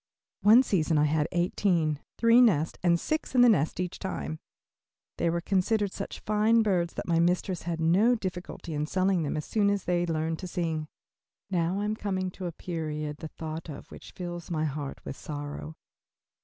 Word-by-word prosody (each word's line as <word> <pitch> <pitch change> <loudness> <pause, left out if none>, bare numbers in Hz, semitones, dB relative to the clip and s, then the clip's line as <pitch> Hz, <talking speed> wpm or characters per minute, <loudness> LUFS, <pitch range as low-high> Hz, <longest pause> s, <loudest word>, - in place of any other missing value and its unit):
One 225 +5 +7
season 165 -9 +1
I 150 - +4
had 150 0 +2
eighteen, 175 -4 +1 0.2
three 230 +1 +6
nests, 165 -10 +3
and 170 -1 +3
six 310 - -2
in 250 - +6
the 245 - +8
nest 160 -7 +2
each 180 -1 -3
time. 170 -4 -4 0.8
They 170 - +2
were 170 +1 0
considered 200 +2 +1
such 200 - -6
fine 215 +2 +3
birds 180 -5 0
that - - -5
my 165 -1 +2
mistress 175 0 0
had 165 -1 -2
no 190 +10 +4
difficulty 185 -5 -5
in 150 0 -1
selling 185 0 +1
them 150 0 -2
as 150 - -3
soon 205 -2 +2
as 200 -2 0
they 175 0 0
learned 160 0 -1
to 185 - -5
sing. 165 -4 -2 0.6
Now 180 +2 0
I - - -1
am 210 +1 -1
coming 190 -3 -2
to 185 0 -6
a - - -3
period 155 -3 -4
the 160 - -6
thought 160 +1 -7
of 145 - -9
which - - -11
fills 175 -2 -6
my 155 -2 0
heart 145 -1 -5
with - - -5
sorrow. 145 +2 -6
175 Hz, 190 wpm, -28 LUFS, 160-195 Hz, 0.8 s, the